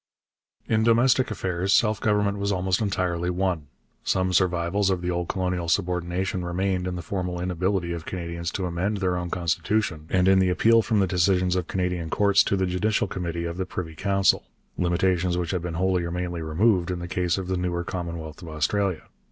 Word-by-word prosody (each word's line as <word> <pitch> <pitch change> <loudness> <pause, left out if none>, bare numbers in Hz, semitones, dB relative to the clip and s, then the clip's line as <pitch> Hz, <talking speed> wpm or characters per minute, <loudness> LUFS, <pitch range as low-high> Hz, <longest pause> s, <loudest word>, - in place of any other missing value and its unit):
In 110 -1 +2
domestic 120 +3 +4
affairs 95 -2 -2
self 105 -2 +3
government 105 -1 +1
was 100 0 0
almost 95 +1 0
entirely 90 -4 -1
won. 90 -4 -1 0.4
Some 95 -1 +1
survivals 90 +2 +2
of 95 -2 0
the 90 - 0
old 85 -1 -2
colonial 90 -3 -2
subordination 90 +2 -1
remained 90 +1 -1
in 90 - -3
the 90 - -5
formal 90 -1 -3
inability 90 0 -1
of 85 -2 -5
Canadians 85 -2 -4
to 95 - -2
amend 90 +4 -1
their 95 -2 0
own 90 0 -3
constitution 85 -1 -1
and 90 0 +2
in 95 0 +6
the 95 -1 +3
appeal 115 +5 +4
from 110 -2 +1
the - - +4
decisions 90 0 +2
of 90 -2 -1
Canadian 90 -3 -2
courts 100 +1 +4
to 100 - +1
the 95 - +1
Judicial 95 +4 +1
Committee 85 -2 -4
of 85 0 -4
the 95 - -1
Privy 85 -3 -5
Council 100 +4 +2 0.3
limitations 90 0 +1
which 85 -2 -2
had 90 -3 -1
been 85 -1 -4
wholly 90 0 +1
or 85 - -3
mainly 90 -1 -3
removed 90 +3 +2
in 90 - -2
the 85 0 -6
case 90 0 0
of 95 -2 -4
the 95 - 0
newer 90 -1 -1
Commonwealth 85 -3 -5
of 85 - -9
Australia. 80 +4 0
90 Hz, 195 wpm, -25 LUFS, 85-95 Hz, 0.4 s, in